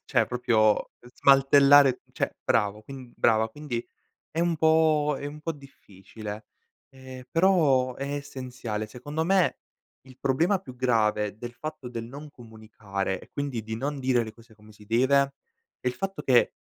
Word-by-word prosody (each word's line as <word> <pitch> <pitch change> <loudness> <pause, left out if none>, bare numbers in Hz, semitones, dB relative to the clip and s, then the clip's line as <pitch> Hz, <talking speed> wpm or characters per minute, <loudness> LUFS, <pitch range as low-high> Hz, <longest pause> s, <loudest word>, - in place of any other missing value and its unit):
cioè - - +2
proprio 115 -4 +2 0.3
smantellare 140 -1 +6
cioè - - -2
bravo 105 +1 +1
quin 130 -1 -11
brava 110 -1 +3
quindi 125 -3 -5 0.5
è 160 - -4
un 170 -1 +1
po' 155 -2 +3
è - - -6
un 150 +1 -7
po' 165 - -2
difficile, 110 -6 -11 0.5
ehm, 130 -1 -11
però 155 -8 +3
è 140 +1 -4
essenziale. 125 -6 -5
Secondo 145 +8 -4
me, 190 0 +2 0.5
il 130 -1 -16
problema 165 +9 +2
più 130 -9 -11
grave 105 -4 +1
del 120 +1 -7
fatto 155 -2 -7
del 115 -1 -5
non 145 +5 -10
comunicare 110 -5 -5
e - - -16
quindi 140 -5 -4
di 110 +1 -5
non 140 +4 -3
dire 130 -2 +2
le 110 - -8
cose 115 -1 -19
come 105 0 -18
si 105 0 -17
deve 135 +5 +2 0.5
è 125 - -2
il 125 - 0
fatto 195 +4 -4
che, 125 -3 +4
130 Hz, 160 wpm, -26 LUFS, 110-145 Hz, 0.5 s, smantellare